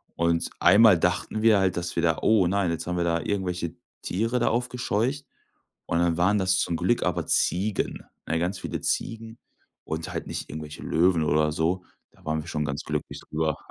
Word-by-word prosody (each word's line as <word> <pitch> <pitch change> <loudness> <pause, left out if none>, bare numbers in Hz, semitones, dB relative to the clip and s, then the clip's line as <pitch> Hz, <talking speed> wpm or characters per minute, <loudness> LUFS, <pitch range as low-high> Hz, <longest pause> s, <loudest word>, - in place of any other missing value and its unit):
Und 85 0 +1
einmal 100 +1 +7
dachten 90 +5 0
wir 110 -2 +5
halt, 95 -2 +1
dass 85 0 -3
wir - - 0
da - - +2
„Oh 105 -5 +4
nein, 95 -2 +1
jetzt 85 - -4
haben 90 - -1
wir 85 - +1
da 85 0 +1
irgendwelche 90 -4 -2 0.3
Tiere 115 +6 -1
da - - +1
aufgescheucht”, 125 +2 -1 0.6
und 85 - 0
dann 85 -1 +2
waren 100 +4 +3
das 95 0 +2
zum 85 - 0
Glück 95 +9 +1
aber 85 -2 -1
Ziegen, 100 +3 0 0.2
ne? 80 - 0
Ganz 90 +3 -1
viele - - -4
Ziegen 115 0 -3 0.5
und 80 0 -4
halt - - -4
nicht - - -5
irgendwelche 75 0 -7
Löwen 85 -1 +2
oder 75 +1 +2
so. 85 +4 0 0.3
Da - - -24
waren 80 0 0
wir - - -14
schon 75 -2 -2
ganz 70 +2 -3
glücklich 75 -1 -4
drüber. 80 -1 0
90 Hz, 195 wpm, -26 LUFS, 80-105 Hz, 0.6 s, einmal